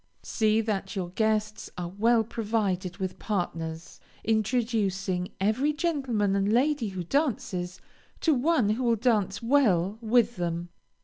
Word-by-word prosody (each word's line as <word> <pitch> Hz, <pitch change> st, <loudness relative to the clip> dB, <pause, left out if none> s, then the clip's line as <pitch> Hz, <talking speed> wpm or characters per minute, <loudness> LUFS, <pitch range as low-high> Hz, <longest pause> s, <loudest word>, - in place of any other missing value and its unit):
See 220 Hz, -1 st, +2 dB
that 205 Hz, -3 st, -3 dB
your 180 Hz, -3 st, -3 dB
guests 215 Hz, +2 st, -1 dB
are 175 Hz, -1 st, -3 dB
well 225 Hz, +5 st, +3 dB
provided 205 Hz, -5 st, -2 dB
with 190 Hz, -2 st, -4 dB
partners, 165 Hz, -5 st, -4 dB, 0.2 s
introducing 210 Hz, -5 st, 0 dB
every 230 Hz, +10 st, +1 dB
gentleman 265 Hz, -, 0 dB
and 200 Hz, +1 st, +1 dB
lady 265 Hz, +1 st, +2 dB
who 185 Hz, -2 st, -5 dB
dances, 190 Hz, -, -1 dB, 0.4 s
to 320 Hz, -, +4 dB
one 270 Hz, -4 st, +2 dB
who 235 Hz, +4 st, -1 dB
will 235 Hz, -1 st, +3 dB
dance 215 Hz, -3 st, +1 dB
well 215 Hz, -7 st, +2 dB
with 235 Hz, 0 st, +2 dB
them. 170 Hz, 0 st, -2 dB
215 Hz, 130 wpm, -27 LUFS, 190-235 Hz, 0.4 s, to